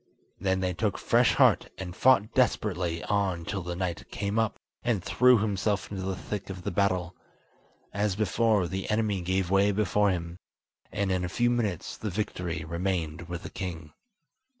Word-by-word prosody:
Then 95 0 0
they 90 -1 0
took 100 +2 -1
fresh - - +3
heart - - +4
and 90 -2 -6
fought 120 -3 +4
desperately 90 -9 +1
on 95 -5 0
till 100 +1 -3
the 90 0 -4
knight 90 -1 -3
came 105 +2 -1
up, 110 -2 0 0.2
and 115 -6 0
threw 125 +4 +5
himself 105 -1 -1
into 95 -2 -4
the 95 0 -2
thick 100 +1 -5
of 95 -2 -7
the - - -2
battle. 90 -2 0 0.8
As 100 -1 0
before, 110 -1 +2
the 95 +2 -4
enemy 105 -3 +1
gave 95 +1 0
way 100 +1 +4
before 105 0 +2
him, 85 -1 -3 0.5
and 100 -1 -1
in 90 -1 0
a 90 - -2
few 120 +5 +2
minutes 105 -8 -2
the 110 - -4
victory 90 -5 -3
remained 85 -1 -2
with 85 +2 -5
the - - -7
king. 85 -5 -6
95 Hz, 175 wpm, -28 LUFS, 90-105 Hz, 0.8 s, threw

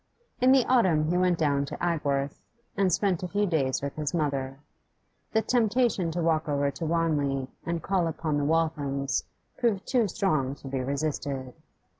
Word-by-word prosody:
In 255 0 +5
the 265 -2 +5
autumn 170 -11 +3
he - - +1
went 180 -1 +2
down 145 -3 +1
to - - -7
Agworth, 145 -5 -1 0.3
and 195 -2 +2
spent 185 0 +1
a 180 - -3
few 205 +3 0
days 140 -8 0
with 140 - -3
his 150 +2 -2
mother. 135 -4 -1 0.7
The 220 0 +2
temptation 230 -6 +2
to 170 +1 -2
walk 160 -1 +1
over 140 -1 +1
to 165 - -5
Wanley 145 -5 0 0.2
and 170 0 -2
call 185 -3 +1
upon 155 -2 -1
the - - 0
Walthams 145 -4 0 0.4
proved 220 -6 +1
too 245 -5 +2
strong 155 -10 0
to 140 - -12
be 135 0 -2
resisted. 140 -1 -3
160 Hz, 170 wpm, -27 LUFS, 140-185 Hz, 0.7 s, In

